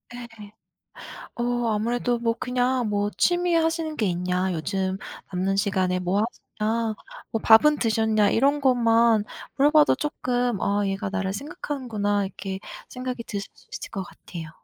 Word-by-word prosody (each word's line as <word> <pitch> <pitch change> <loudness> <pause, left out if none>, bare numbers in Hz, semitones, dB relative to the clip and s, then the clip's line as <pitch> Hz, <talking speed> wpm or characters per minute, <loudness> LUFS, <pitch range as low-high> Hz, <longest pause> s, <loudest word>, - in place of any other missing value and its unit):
예. 225 -4 -10 0.8
어 240 0 -1
아무래도 240 +3 0
뭐 230 -1 0
그냥 250 -1 0
뭐 205 0 0
"취미 350 0 +2
하시는 325 -1 0
게 215 - +1
있냐? 180 +1 0
요즘 190 +3 -2 0.4
남는 190 +2 0
시간에 190 -3 +1
뭐 185 +3 +1 0.4
하시냐? 220 +1 0 0.4
뭐 225 - -1
밥은 295 +7 +6
드셨냐?" 220 -2 +2
이런 280 +5 +3
것만 230 -4 +4 0.3
물어봐도 295 +2 +5
쪼끔 245 -7 -1
'아, 205 +1 +1
얘가 195 0 -2
나를 190 -1 -2
생각하는구나.' 215 -6 -2
이렇게 190 0 -5 0.3
생각이 250 -1 -5
드실 200 -2 -5
수 - - -23
있을 - - -6
것 195 - -4
같아요. 165 -3 -9
225 Hz, 290 characters per minute, -25 LUFS, 195-250 Hz, 0.8 s, 밥은